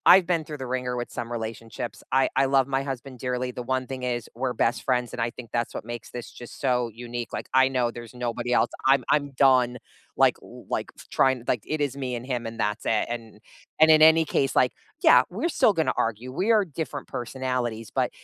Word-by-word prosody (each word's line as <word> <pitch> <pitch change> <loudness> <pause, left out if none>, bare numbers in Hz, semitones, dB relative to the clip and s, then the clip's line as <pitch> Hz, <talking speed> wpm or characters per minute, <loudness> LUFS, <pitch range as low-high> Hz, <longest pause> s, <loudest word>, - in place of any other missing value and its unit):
I've 190 - +4
been 160 -2 -1
through 150 -1 -7
the 130 - -5
ringer 125 -1 -3
with 120 0 -4
some 115 - -5
relationships, 115 0 -5
I 135 +1 +4 0.2
I - - +4
love 135 -1 +3
my 135 0 0
husband 135 -1 -6
dearly, 125 0 -2
the 125 - -6
one 130 0 -2
thing 130 0 -6
is, 120 -1 -1
we're 125 +1 -1
best 120 +2 0
friends, 125 -2 +1
and - - -3
I 115 - +1
think 120 -2 -10
that's 120 -1 -1
what - - -4
makes 120 0 -7
this 120 -1 -6
just 120 - -11
so 125 -3 +1 0.2
unique, 120 0 -5
like, - - -7
I 130 0 +6
know 125 -3 0
there's 120 -1 -10
nobody 120 0 -2
else, - - +3 0.2
I'm 135 -1 +5
I'm 145 -1 +2
done, 130 -2 +4 0.5
like - - +2
like, - - -5
f - - -13
trying 130 -3 +2
like, 120 - 0
it 155 -1 -2
is 140 -2 -1
me 130 -2 -3
and 120 +1 -6
him, 125 -3 -3
and 115 0 -8
that's 105 0 -1
it, 110 - +2
and 115 -3 -9 0.4
and, 160 0 +7
in 155 0 +6
any 160 +1 +7
case, 135 -3 0
like, 125 - +4 0.3
yeah, - - +7
we're 340 - -2
still 235 -6 +6
gonna 160 -4 +1
argue, 115 +3 -7
we 190 - +1
are 215 -2 +5
different 150 -3 -5
personalities, 120 -3 -3
but, - - +2
125 Hz, 225 wpm, -26 LUFS, 120-135 Hz, 0.5 s, and